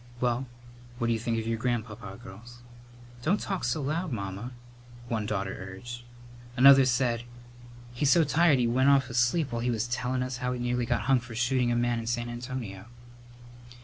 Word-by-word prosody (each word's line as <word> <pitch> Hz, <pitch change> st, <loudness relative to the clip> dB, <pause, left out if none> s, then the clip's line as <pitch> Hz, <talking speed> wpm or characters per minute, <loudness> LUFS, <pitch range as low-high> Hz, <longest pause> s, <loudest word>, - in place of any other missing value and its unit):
Well, 125 Hz, +1 st, 0 dB, 0.5 s
what 120 Hz, -1 st, -1 dB
d'you 115 Hz, -1 st, +1 dB
think 115 Hz, 0 st, -1 dB
of 110 Hz, -, -2 dB
your 115 Hz, 0 st, -1 dB
grandpapa, 110 Hz, -4 st, -3 dB
girls?" 120 Hz, +3 st, -12 dB, 0.6 s
"Don't 180 Hz, +10 st, +1 dB
talk 195 Hz, -3 st, -3 dB
so 155 Hz, -, -1 dB
loud, 160 Hz, +4 st, -2 dB
Mamma," 100 Hz, +2 st, -5 dB, 0.6 s
one 110 Hz, -3 st, -1 dB
daughter 95 Hz, -2 st, -2 dB
urged. 95 Hz, +6 st, -8 dB, 0.6 s
Another 135 Hz, +1 st, +8 dB
said, 125 Hz, -2 st, +1 dB, 0.7 s
"He's 135 Hz, +3 st, +1 dB
so 170 Hz, +3 st, +6 dB
tired 155 Hz, 0 st, +4 dB
he 125 Hz, -, +2 dB
went 130 Hz, +4 st, +3 dB
off 135 Hz, -2 st, +3 dB
asleep 125 Hz, +5 st, +1 dB
while 115 Hz, 0 st, -2 dB
he 125 Hz, -, 0 dB
was 115 Hz, -1 st, -1 dB
telling 125 Hz, +1 st, -1 dB
us 125 Hz, 0 st, -4 dB
how 125 Hz, 0 st, -2 dB
he 125 Hz, -, -5 dB
nearly 120 Hz, 0 st, -1 dB
got 120 Hz, -, +1 dB
hung 135 Hz, -1 st, +3 dB
for 120 Hz, -1 st, -10 dB
shooting 120 Hz, +1 st, +1 dB
a -, -, +1 dB
man 120 Hz, 0 st, +1 dB
in 115 Hz, -, -6 dB
San 120 Hz, 0 st, -1 dB
Antonio." 120 Hz, -5 st, -6 dB
120 Hz, 180 wpm, -28 LUFS, 115-130 Hz, 0.7 s, Another